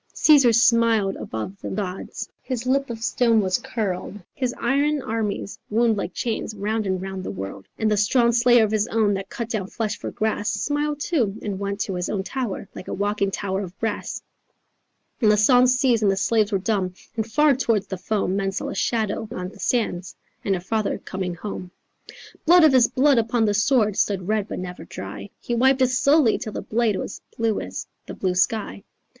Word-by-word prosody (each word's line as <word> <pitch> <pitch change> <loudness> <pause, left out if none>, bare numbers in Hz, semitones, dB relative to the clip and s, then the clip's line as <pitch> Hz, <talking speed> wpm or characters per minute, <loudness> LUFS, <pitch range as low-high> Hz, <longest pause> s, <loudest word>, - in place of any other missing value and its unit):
"Caesar 280 -6 +6
smiled 230 -3 +3
above 150 - -6
the - - -5
gods, 190 -2 -5
His 255 -2 -4
lip 275 +1 +1
of 225 -1 -6
stone 230 -1 +3
was 185 -3 +1
curled, 195 -4 -3 0.2
His 255 -2 -1
iron 285 +5 +1
armies 215 -3 -3
wound 225 +1 +3
like 195 -2 -3
chains 220 -2 -3
Round 215 +1 -2
and 190 -1 0
round 190 0 -5
the - - -5
world, 95 0 -7
And 220 -1 +1
the 210 - +2
strong 235 +4 +3
slayer 240 0 +5
of 215 - 0
his 215 0 +1
own 220 -3 +2
That 195 0 -4
cut 235 - -4
down 210 -5 -2
flesh 215 0 -3
for - - -4
grass, 215 -1 -1
Smiled 290 +6 -1
too, 235 - 0
and 200 -3 -3
went 200 +1 -3
to 195 - -2
his 180 -1 -3
own 195 -2 -1
tower 235 -4 -4
Like - - -9
a - - -3
walking 205 0 0
tower 195 0 -2
of 190 0 -8
brass, 225 -1 -3 1.0
And 215 -3 +5
the 210 - +3
songs 250 +3 +5
ceased 250 -4 +2
and 205 -2 +4
the 195 - -1
slaves 215 +2 +2
were 200 - +2
dumb; 190 -2 -1 0.2
And 220 0 -3
far 300 +3 +4
towards 230 -6 +1
the 190 -3 -6
foam 195 -2 -1
Men 195 -1 0
saw 195 - -4
a - - -4
shadow 220 -2 -1
on 180 -7 -4
the 205 - -16
sands; 185 -4 -1 0.3
And 195 - +1
her 175 - -4
father 215 +3 -1
coming 185 -2 -5
home.... 180 -1 -6 0.8
Blood 350 +1 +7
of 310 -3 +6
his 250 -2 +6
blood 275 -1 +3
upon 225 0 +1
the 205 - +2
sword 215 0 +2
Stood 190 -4 0
red 215 -1 0
but - - -5
never 180 -1 -6
dry. - - -8
He 240 - -4
wiped 265 +3 +3
it 255 - +3
slowly, 275 -1 +4
till 215 - -6
the - - -5
blade 225 -2 +1
Was 195 - -5 0.2
blue 225 -2 +1
as - - -6 0.2
the - - -7
blue 185 -2 -1
sky. 205 +1 0
215 Hz, 205 wpm, -23 LUFS, 195-240 Hz, 1.0 s, Blood